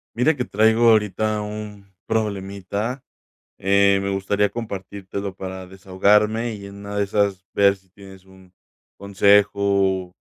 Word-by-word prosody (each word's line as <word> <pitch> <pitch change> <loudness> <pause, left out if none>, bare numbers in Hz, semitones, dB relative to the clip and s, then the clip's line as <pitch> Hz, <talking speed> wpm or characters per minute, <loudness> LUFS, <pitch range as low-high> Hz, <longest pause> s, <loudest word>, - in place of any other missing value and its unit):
Mira 135 +7 +2
que 125 -3 -3
traigo 110 +3 +3
ahorita 105 0 +1
un 105 -1 -7 0.2
problemita, 105 +3 -3 0.5
eh, 100 0 +3
me 100 - -2
gustaría 100 +1 0
compartírtelo 100 -3 -6
para 95 -1 -7
desahogarme 105 +5 +1
y 100 -1 -10
en 100 0 -11
una 100 0 -8
de 100 - +1
esas 100 -2 -1
ver 100 -1 +4
si 95 -1 -27
tienes 95 0 -15
un 95 -1 -19 0.4
consejo 100 +1 +3 0.5
o - - -58
100 Hz, 135 wpm, -22 LUFS, 95-105 Hz, 0.5 s, ver